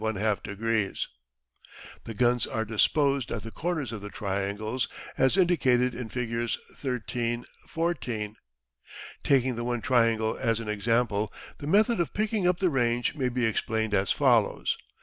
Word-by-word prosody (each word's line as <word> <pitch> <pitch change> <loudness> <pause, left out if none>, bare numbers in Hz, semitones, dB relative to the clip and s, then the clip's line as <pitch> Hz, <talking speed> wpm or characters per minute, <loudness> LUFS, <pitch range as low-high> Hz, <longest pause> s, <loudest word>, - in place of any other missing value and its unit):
The 110 0 -1 1.1
guns 120 +1 +2
are 110 0 -2
disposed 135 +4 +2
at 110 - -3
the 115 - -7
corners 160 -6 -2
of 110 -3 -6
the 105 - -6
triangles 105 +4 -2 0.3
as 130 +7 +3
indicated 130 -9 +3
in 120 -1 -5
Figs. 120 -1 -2 0.2
13 120 -2 -2 0.2
14. 125 -11 -2 0.9
Taking 130 -3 +3
the 120 - -3
one 120 -1 -1
triangle 115 -3 +2
as 115 -2 +1
an 115 -2 -5
example, 110 0 +1 0.3
the 145 - -6
method 215 +6 +4
of 170 - -1
picking 215 -3 +1
up 180 -1 +3
the 185 -1 +2
range 120 -2 +1
may 135 -5 0
be 125 -1 0
explained 110 0 0
as 95 -2 +2
follows. - - +3
120 Hz, 140 wpm, -28 LUFS, 110-130 Hz, 1.1 s, method